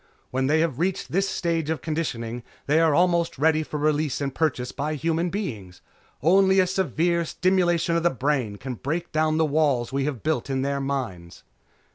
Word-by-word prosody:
When 130 +1 0
they 155 +2 +3
have 160 -5 -1
reached 180 +2 -1
this 195 +3 +1
stage 165 -3 -1
of 160 -5 -2
conditioning 125 -8 -3 0.2
they 150 +3 +3
are 160 -3 +4
almost 170 -2 +2
ready 155 +2 +3
for 155 -1 -5
release 150 -2 0
and 140 -2 -2
purchase 130 -5 -1
by 150 +2 -3
human 165 +3 0
beings. 110 - -5 0.4
Only 190 +3 +5
a 185 - +5
severe 170 -1 0
stimulation 175 -1 +1
of 170 - +2
the 175 - +3
brain 130 -5 -1
can 125 +5 -6
break 160 +8 -3
down 155 0 +1
the 160 - +3
walls 145 -5 +1
we 135 0 0
have 140 -7 -4
built 155 -2 -1
in 135 -1 0
their 140 0 -1
minds." 120 -12 -4
155 Hz, 185 wpm, -25 LUFS, 135-170 Hz, 0.4 s, Only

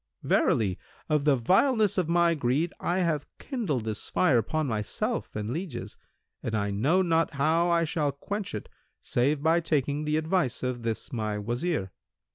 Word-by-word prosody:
Verily, 100 -5 +2 0.3
of 150 -2 +2
the 145 -2 +5
vileness 210 - +3
of 180 -4 0
my 170 0 +4
greed 145 +3 0
I 180 +2 0
have 155 -5 0
kindled 185 - -2
this 110 -1 -4
fire 140 -10 +3
upon 155 +8 -1
myself 110 -5 -2
and 105 +1 -3
lieges, 160 -4 -5 0.5
and 110 - -3
I 100 -1 0
know 145 - +2
not 165 -3 +1
how 160 +5 +2
I 170 -1 +3
shall 150 -2 0
quench 195 - -5
it, 105 - -6 0.4
save 140 +4 +1
by 165 +2 +4
taking 150 -2 0
the 150 0 +1
advice 160 -5 0
of 125 -1 -2
this 115 +1 -4
my 110 -3 -2
Wazir." 120 - -2
150 Hz, 165 wpm, -28 LUFS, 120-170 Hz, 0.5 s, the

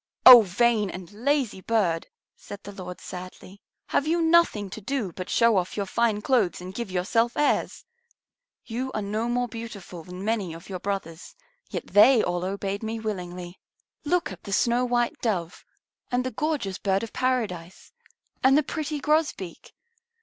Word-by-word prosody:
"Oh, 250 -2 +12
vain 215 +1 +1
and 185 0 -8
lazy 245 -2 0
bird!" 185 -7 0 0.3
said 200 - -10
the 205 - -8
Lord 180 -3 -8
sadly. 185 +2 -10 0.3
"Have 285 - +1
you 335 +2 +2
nothing 325 -11 +3
to 220 - -7
do 225 -3 -2
but 185 +1 -7
show 230 -3 +4
off 180 +2 -2
your 200 - -1
fine 215 0 0
clothes 235 -9 +2
and 180 +1 -8
give 235 0 -5
yourself 225 +6 0
airs? 295 - 0 0.8
You 255 +3 -4
are 215 - -2
no 215 +4 -2
more 245 0 0
beautiful 215 -7 -8
than 180 +3 -8
many 205 -7 -1
of 165 +4 -12
your 185 -2 -4
brothers, 185 -4 -5 0.3
yet - - -4
they 225 +3 +6
all 175 0 -1
obeyed 195 +1 -3
me 225 0 -4
willingly. 180 -4 -6 0.4
Look 350 +3 0
at - - -10
the 200 - -5
snow 240 +4 +2
white 240 -1 0
Dove, 180 -7 -2 0.5
and 250 0 +1
the 255 - -3
gorgeous 285 -13 -2
Bird 195 0 0
of 230 - -7
Paradise, 205 -9 -2 0.5
and 270 +2 +6
the 305 - +3
pretty 300 +1 -3
Grosbeak. 295 - -1
215 Hz, 165 wpm, -26 LUFS, 185-245 Hz, 0.8 s, Oh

